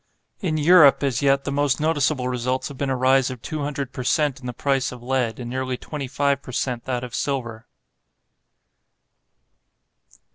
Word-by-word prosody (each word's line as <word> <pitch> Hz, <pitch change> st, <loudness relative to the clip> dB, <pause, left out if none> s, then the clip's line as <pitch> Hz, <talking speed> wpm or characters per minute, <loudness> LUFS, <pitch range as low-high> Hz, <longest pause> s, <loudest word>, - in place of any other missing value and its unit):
In 160 Hz, -5 st, -1 dB
Europe, 155 Hz, -3 st, +6 dB
as 135 Hz, -2 st, 0 dB
yet, 140 Hz, 0 st, +3 dB
the 140 Hz, -, -3 dB
most 140 Hz, -1 st, +1 dB
noticeable 150 Hz, -4 st, +1 dB
results 125 Hz, +1 st, -2 dB
have 140 Hz, -, -10 dB
been 140 Hz, -, -1 dB
a 130 Hz, -, +1 dB
rise 130 Hz, +1 st, +3 dB
of 130 Hz, -2 st, -7 dB
two 155 Hz, -, -4 dB
hundred 140 Hz, -2 st, -4 dB
per 130 Hz, -, -5 dB
cent. 145 Hz, +1 st, +1 dB
in 125 Hz, -, -8 dB
the -, -, -2 dB
price 135 Hz, +1 st, 0 dB
of 125 Hz, -1 st, -10 dB
lead, 125 Hz, -3 st, -1 dB
and 120 Hz, -, -6 dB
nearly 130 Hz, +1 st, -3 dB
twenty 145 Hz, +1 st, -6 dB
five 140 Hz, +1 st, 0 dB
per 130 Hz, -, -10 dB
cent. 125 Hz, -1 st, -2 dB
that 125 Hz, -1 st, -2 dB
of 125 Hz, -, -7 dB
silver. 120 Hz, -5 st, -3 dB
135 Hz, 180 wpm, -23 LUFS, 125-140 Hz, -, Europe